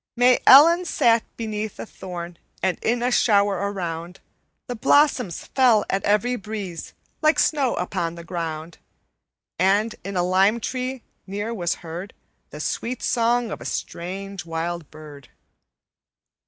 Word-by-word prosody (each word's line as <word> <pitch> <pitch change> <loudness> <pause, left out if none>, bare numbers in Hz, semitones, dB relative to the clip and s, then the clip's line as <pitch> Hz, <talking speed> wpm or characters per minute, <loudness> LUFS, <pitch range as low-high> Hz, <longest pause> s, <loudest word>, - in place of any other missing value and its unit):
"_May 250 0 +5
Ellen 335 +6 +8
sat 235 -8 +3
beneath 215 -1 -4
a - - -5
thorn 175 -4 -8 0.2
And 190 -1 0
in 240 +1 0
a 250 - +1
shower 205 -4 +3 0.2
around 175 -1 -5 0.5
The 245 - -4
blossoms 260 - +2
fell 245 -5 +3
at 195 - -1
every 210 +5 +2
breeze 200 -5 -7 0.3
Like 310 +1 +4
snow 280 -5 +2
upon 170 -2 -2
the 170 - -9
ground, 165 -1 -5 0.8
And 200 +5 +2
in 195 -1 -4
a 175 - +2
lime 190 +5 +3
tree 255 +1 -4 0.2
near 205 +4 -4
was 175 -6 -1
heard 175 +5 -7 0.3
The 150 - -10
sweet 235 +10 -3
song 235 -1 +1
of - - -6
a - - -9
strange, 195 +3 -5
wild 165 0 -4
bird. 150 -3 -13
200 Hz, 140 wpm, -23 LUFS, 175-240 Hz, 0.8 s, Ellen